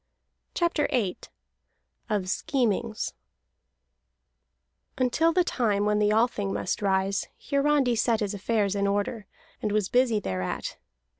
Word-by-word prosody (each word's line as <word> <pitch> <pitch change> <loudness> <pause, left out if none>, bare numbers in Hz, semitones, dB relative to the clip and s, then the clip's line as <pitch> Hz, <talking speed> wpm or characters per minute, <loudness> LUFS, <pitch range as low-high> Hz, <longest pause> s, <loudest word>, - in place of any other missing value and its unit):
CHAPTER 340 -3 +1
VIII 215 -9 0 0.9
OF 205 -4 0
SCHEMINGS 230 +1 -1 1.8
Until 265 +6 +2
the 360 +2 +3
time 210 - 0
when 210 0 +2
the 210 0 +3
Althing 215 -3 +1
must - - -2
rise, 195 0 +1
Hiarandi 280 -3 +2
set 225 0 +2
his 210 -2 -2
affairs 205 0 0
in 200 0 0
order, 205 +1 -1 0.3
and 210 - -1
was 210 -2 +1
busy 245 -3 +3
thereat. 90 - -3
215 Hz, 120 wpm, -27 LUFS, 200-250 Hz, 1.8 s, the